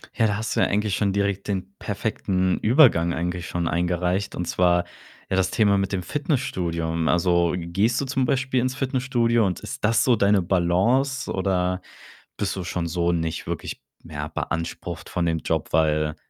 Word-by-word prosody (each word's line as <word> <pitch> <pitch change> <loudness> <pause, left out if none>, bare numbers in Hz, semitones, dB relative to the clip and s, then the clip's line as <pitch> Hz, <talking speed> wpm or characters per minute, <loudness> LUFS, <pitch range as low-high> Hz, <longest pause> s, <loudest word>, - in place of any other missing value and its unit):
Ja, 115 -2 +3
da 105 -1 -1
hast 110 0 -3
du - - +1
ja - - +5
eigentlich 105 -1 0
schon 100 -2 0
direkt 100 -1 -1
den 95 -1 -3
perfekten 95 -3 -1
Übergang 110 - +5
eigentlich 90 +2 -3
schon 85 -1 -2
eingereicht, 90 +2 -1
und 90 - -3
zwar, 90 0 +2 0.4
ja, 95 - 0
das 95 -1 +1
Thema 100 -3 +3
mit 95 0 -1
dem 95 - -1
Fitnessstudio. 90 - -2
Also, 85 -1 +2
gehst 95 +8 0
du 140 - -2
zum 130 0 0
Beispiel 130 0 +1
ins 130 +1 -1
Fitnessstudio 125 -4 +1
und 90 -3 -1
ist - - -8
das 115 0 +3
so 125 - +4
deine 100 -2 +3
Balance, 95 +10 +1
oder 90 -1 0 0.6
bist 100 -2 -2
du 95 - -4
schon 85 0 -3
so 85 +1 0
nicht 80 -1 -2
wirklich - - -5 0.2
mehr 75 -2 -6
beansprucht 85 +1 -4
von 90 - -1
dem 80 -1 0
Job, - - -2
weil 75 -1 +2
95 Hz, 175 wpm, -24 LUFS, 85-110 Hz, 0.6 s, ja